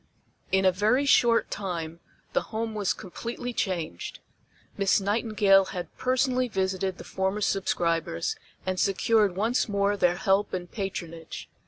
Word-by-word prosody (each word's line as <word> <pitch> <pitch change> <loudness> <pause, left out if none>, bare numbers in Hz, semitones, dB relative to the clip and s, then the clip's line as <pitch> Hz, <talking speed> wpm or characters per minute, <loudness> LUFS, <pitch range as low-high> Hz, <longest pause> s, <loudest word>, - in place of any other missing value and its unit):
In 190 0 +3
a 185 - +6
very 215 +9 +2
short 235 -4 +4
time 170 -4 -4 0.3
the - - +2
Home 225 0 -3
was 205 -3 0
completely 240 +6 -5
changed. 170 - -3 0.6
Miss 200 +1 +3
Nightingale 200 -1 +3
had 180 -2 -6
personally 255 0 +1
visited 190 -3 -1
the - - -9
former 190 +2 -2
subscribers, 170 - 0 0.3
and 185 0 -1
secured 205 0 +2
once 225 +4 +1
more 200 0 +1
their 180 -3 +2
help 195 +1 +1
and 175 -1 -6
patronage. 170 -5 -6
195 Hz, 135 wpm, -27 LUFS, 185-220 Hz, 0.6 s, a